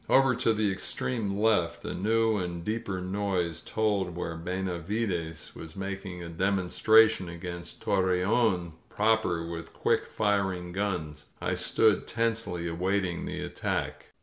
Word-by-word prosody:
Over 135 -1 +5
to 115 - +3
the 110 -2 +1
extreme 100 +1 -2
left 105 -6 +2
a - - -3
new 110 +3 +2
and 85 -2 -4
deeper 105 -4 -2
noise 90 -3 -1
told 100 -5 0
where 85 -2 -3
Benavides 90 -1 -3
was 80 -1 -9
making 95 -2 -5
a - - -6
demonstration 100 +3 +4
against 85 0 -7
Torreon 95 -1 +2 0.2
proper 105 -6 +2
with 85 0 -6
quick - - +1
firing 95 -3 0
guns. 85 -6 -3
I - - -1
stood 110 -2 +2
tensely 110 -7 -1
awaiting 90 +1 -1
the - - -4
attack. - - -3
95 Hz, 125 wpm, -29 LUFS, 85-105 Hz, 0.2 s, Over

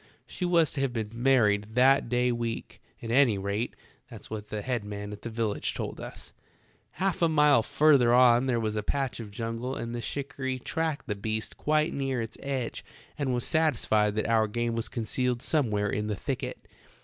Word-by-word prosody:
She 180 - -4
was 170 -3 +3
to 140 - -3
have 135 -3 0
been 110 -3 -3
married 110 -4 +2
that 130 0 +4
day 125 +1 +2
week; 120 -1 -4 0.2
at 115 - -4
any 120 -4 +4
rate, 100 +4 -2 0.3
that's - - -11
what 105 -1 -5
the 105 -1 -4
head 125 -4 -1
man 105 0 -6
at 105 - -10
the 115 - -5
village 110 -2 -2
told - - -4
us. - - -8 0.6
"Half 190 -2 -1
a 170 - +4
mile 150 -5 +5
further 135 -1 +4
on 125 0 +5
there 120 -2 +1
was 110 -1 -2
a 105 - 0
patch 130 0 -2
of 110 -3 -7
jungle 115 +4 -4
and 115 0 -5
the 120 - -3
shikarry 135 +1 -3
tracked 160 +3 -2
the 105 - -2
beast 110 +2 -4
quite 155 +1 +1
near 135 -2 -1
its 115 -1 -5
edge 135 -3 -3 0.3
and 140 -3 -1
was 120 -1 0
satisfied 110 - +2
that 110 - 0
our 110 -1 +3
game 120 +2 -1
was 115 - -3
concealed 120 +2 -1
somewhere 105 -9 +1
in 105 0 -2
the 105 - -1
thicket. - - -5
120 Hz, 195 wpm, -28 LUFS, 110-135 Hz, 0.6 s, mile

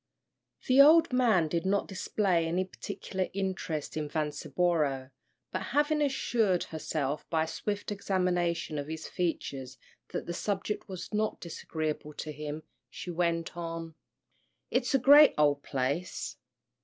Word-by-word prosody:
The 260 +2 +7
old 310 0 +7
man 225 -10 +4
did 165 +1 -1
not 200 +1 +1
display 185 -3 0
any 180 +3 0
particular 190 0 -4
interest 190 -6 -3
in 150 -1 -2
Vanceboro, 150 -2 0 0.4
but - - -2 0.2
having 300 +1 +3
assured 230 -9 +1
herself 155 -2 -3
by 160 -1 +2
a - - -4
swift 205 +5 -3
examination 180 -5 0
of 140 - -5
his 160 0 -5
features 135 -7 -3 0.3
that - - -4
the 170 - -4
subject 205 +3 -3
was 185 +2 -7
not 215 0 0
disagreeable 155 -3 -4
to 155 - -5
him, 150 +1 -6 0.3
she 180 - -6
went 170 -1 -1
on, 165 -1 -5 0.8
"It's - - +1
a - - +7
great 285 +4 +8
ole 145 -1 +4
place. 140 +5 -2
175 Hz, 135 wpm, -30 LUFS, 155-200 Hz, 0.8 s, great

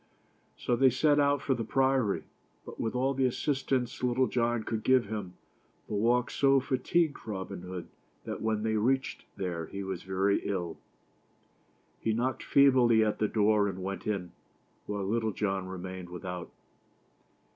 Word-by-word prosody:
So 120 - 0
they 130 +2 +5
set 145 +4 +3
out 145 -1 +2
for 135 - +2
the 115 -2 -2
Priory, 130 -3 +1 0.4
but - - -10
with 115 - -2
all 130 +2 +1
the 135 -1 +2
assistance 130 -1 -1
Little 125 +1 +2
John 120 -2 0
could 110 -1 -3
give 130 0 +4
him, 100 -3 -5 0.5
the - - -6
walk 120 +4 +2
so 135 -1 +4
fatigued 140 +4 0
Robin 95 -4 -5
Hood 90 -1 -6 0.4
that - - -5
when 110 -1 0
they 110 -1 +1
reached 130 +5 0
there 85 -4 -3
he 100 0 -5
was 95 -2 -4
very 95 +1 +1
ill. 90 -5 -3 1.2
He 110 - 0
knocked 125 +3 -1
feebly 125 -5 +5
at 105 - -1
the 105 - +2
door 105 -1 +3
and 95 -1 -5
went 95 +1 -4
in, 95 -5 -2 0.6
while 100 -1 -2
Little 110 +1 0
John 95 -2 -1
remained 95 -1 -7
without. 90 0 -6
110 Hz, 155 wpm, -30 LUFS, 95-130 Hz, 1.2 s, they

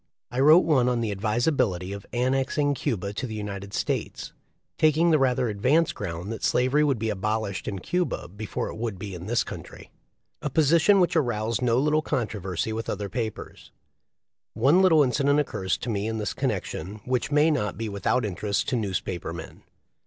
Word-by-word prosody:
I 125 - -3
wrote 155 +6 +7
one 130 -6 +3
on 120 -1 0
the 110 -2 -1
advisability 105 - 0
of 100 -1 -8
annexing 135 +3 +1
Cuba 100 -6 -2
to 125 +5 -4
the 110 - -6
United 100 -2 -6
States, - - -3 0.5
taking 155 +2 +4
the 155 - +4
rather 125 -2 +2
advanced 130 +10 +2
ground 90 +1 -5
that 115 - -6
slavery 130 +4 +3
would 140 -4 +2
be 110 0 -1
abolished 105 0 -2
in 100 - -3
Cuba 180 - -2
before 105 +4 -5
it - - -8
would 110 -4 -4
in 95 -3 -6
this 120 +1 +1
country - - -10 0.3
— - - -50
a 150 - -2
position 160 +7 +4
which 180 -1 +2
aroused 115 -5 0
no 120 -1 +2
little 150 +3 +2
controversy 110 - -2
with 115 +1 -4
other 100 0 -3
papers. 110 +1 -5 0.8
One 140 +11 +4
little 165 -5 +6
incident 140 +2 +2
occurs 95 -10 -1
to - - -5
me 100 0 -1
in 110 0 -2
this 105 -2 -2
connection 100 +6 -3
which 125 0 0
may 150 +2 +4
not 105 -11 -1
be 115 0 -3
without 105 +4 0
interest 100 +1 -2
to 130 - 0
newspaper 95 -6 -3
men. 85 -2 -9
115 Hz, 180 wpm, -26 LUFS, 100-140 Hz, 0.8 s, wrote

